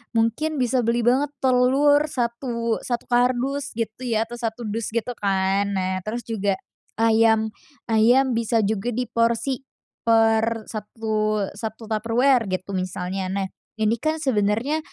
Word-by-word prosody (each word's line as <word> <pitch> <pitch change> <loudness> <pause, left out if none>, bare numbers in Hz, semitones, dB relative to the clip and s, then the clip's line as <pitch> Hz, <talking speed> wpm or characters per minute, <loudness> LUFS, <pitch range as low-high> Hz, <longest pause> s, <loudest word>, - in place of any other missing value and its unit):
mungkin 230 +8 +1
bisa 255 -1 +1
beli 235 0 +1
banget 255 +5 +3 0.2
telur 265 +3 +4
satu 235 -3 -2
satu 240 -1 -3
kardus 255 +3 +1
gitu 230 +2 -4
ya, 225 -2 +1
atau 235 +1 -9
1 230 0 -3
dus 220 +1 -3
gitu 235 +2 -2
kan. 195 0 +1
Nah, 185 0 -1
terus 215 +6 -5
juga 205 -3 -1 0.4
ayam 220 -1 +3 0.4
ayam 245 +4 +4
bisa 230 -1 +1
juga 210 +2 -1
diporsi 235 +2 0 0.4
per 225 0 +3
satu 215 -1 -2
satu 220 +2 -7
Tupperware 230 +2 +2
gitu 185 +1 -3
misalnya. 185 0 -3
Nah, 195 +1 -2 0.3
ini 220 +1 +1
kan 310 +5 0
sebenarnya 230 +4 +1
230 Hz, 135 wpm, -23 LUFS, 215-245 Hz, 0.4 s, telur